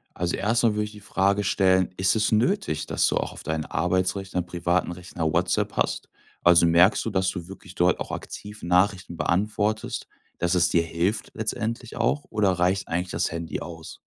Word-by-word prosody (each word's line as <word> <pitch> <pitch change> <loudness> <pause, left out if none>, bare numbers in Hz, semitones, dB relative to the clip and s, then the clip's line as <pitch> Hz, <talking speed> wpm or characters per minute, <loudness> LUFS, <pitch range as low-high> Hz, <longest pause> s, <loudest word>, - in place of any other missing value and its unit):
Also, 90 0 -1
erst 115 +4 +1
mal 110 -2 +4
würde 105 0 0
ich 105 - -9
die 105 - -12
Frage 100 0 +1
stellen: 95 -2 +2
„Ist 95 +3 +2
es 105 0 +1
nötig, 110 - +1
dass - - +2
du - - +1
auch - - -2
auf - - -10
dein 80 -1 -2
Arbeitsrechner, 95 +3 -1
privaten 85 0 -1
Rechner 85 -2 -3
WhatsApp - - +1
hast? - - -1 0.3
Also, 85 -1 +6
merkst 85 +5 +5
du, - - 0
dass 95 -2 +1
du 90 -2 -6
wirklich 95 -1 -12
dort 90 0 +2
auch - - -5
aktiv 105 0 -8
Nachrichten 90 -1 +1
beantwortest, 105 +6 -1 0.3
dass 90 +1 +1
es 90 0 +4
dir 85 -1 +3
hilft, 85 +6 -1
letztendlich 115 +2 -4
auch, 145 +5 0
oder 105 -3 +2
reicht 90 +2 +1
eigentlich 90 +2 -2
das - - -1
Handy 85 0 -4
aus? 80 -2 -9
95 Hz, 185 wpm, -25 LUFS, 85-105 Hz, 0.3 s, Also